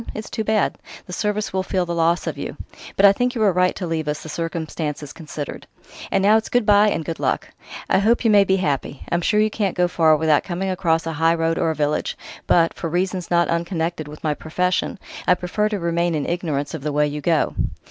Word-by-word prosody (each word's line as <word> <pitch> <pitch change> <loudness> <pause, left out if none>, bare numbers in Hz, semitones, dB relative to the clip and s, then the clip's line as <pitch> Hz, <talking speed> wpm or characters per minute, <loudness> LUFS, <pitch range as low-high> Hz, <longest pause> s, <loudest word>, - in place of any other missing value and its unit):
It's 215 - -6
too 220 - -2
bad: 215 -1 +1 0.3
the 180 - -9
Service 210 +1 -1
will 190 - +1
feel 185 -1 -1
the 170 - -3
loss 170 +1 +1
of - - -3
you. - - -6 0.4
But 195 - +6
I 200 - +8
think 245 +4 -1
you 225 - -2
were 205 -2 +5
right 180 +1 +2
to 185 - -4
leave 160 -2 -2
us, 150 0 -3
the 160 - -8
circumstances 155 -3 -4
considered.... 150 -3 -7 0.4
And 195 - +1
now 210 +2 +6
it's 220 - -3
good 245 -2 +2
bye 205 0 +5
and 160 -5 -2
good 165 - -4
luck! - - 0 0.4
I - - +3
hope 230 +4 +2
you 225 - +5
may 205 -1 +7
be 190 -1 +2
happy.... 145 -6 -2
I'm 170 - +1
sure 210 +4 +2
you 215 0 +2
can't 200 -5 -1
go 180 0 +3
far 160 -3 +4
without 155 -1 +3
coming 190 +1 -2
across 165 -3 +1
a 165 - -3
highroad 165 +1 +1
or 165 - +1
a 160 - -1
village; 150 0 -1 0.3
but 165 -1 +4
for 165 - -4
reasons 180 +1 -1
not 170 0 +3
unconnected 170 -2 -2
with 150 +1 -11
my 155 -2 +1
profession 180 +5 -1 0.3
I 180 - +6
prefer 200 +4 -1
to 210 - -2
remain 170 0 0
in 150 - -1
ignorance 155 -5 -2
of 160 - -5
the 150 +1 -2
way 150 +1 +2
you 150 0 -4
go." 160 +1 +1
170 Hz, 235 wpm, -22 LUFS, 160-195 Hz, 0.4 s, I